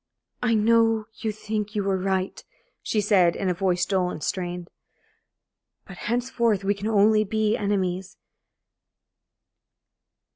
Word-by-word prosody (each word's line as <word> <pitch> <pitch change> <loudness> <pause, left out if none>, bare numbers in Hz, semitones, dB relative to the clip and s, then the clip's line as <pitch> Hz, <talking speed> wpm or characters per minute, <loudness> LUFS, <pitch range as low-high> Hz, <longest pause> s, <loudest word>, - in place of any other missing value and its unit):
"I 235 -2 +2
know 225 0 +3
you 220 - -2
think 215 0 -4
you 205 - 0
were 195 -1 +1
right," 190 0 -2 0.4
she 215 - 0
said, 190 -4 +3
in 190 - -1
a - - +2
voice 180 0 0
dull 185 -2 0
and 155 - -6
strained, 180 -2 -3 1.2
"but 190 - -11
henceforth 235 -4 0
we 200 +1 +2
can 205 +1 -5
only 215 0 +4
be 215 +1 0
enemies. 190 -3 -2
205 Hz, 130 wpm, -25 LUFS, 185-220 Hz, 1.2 s, only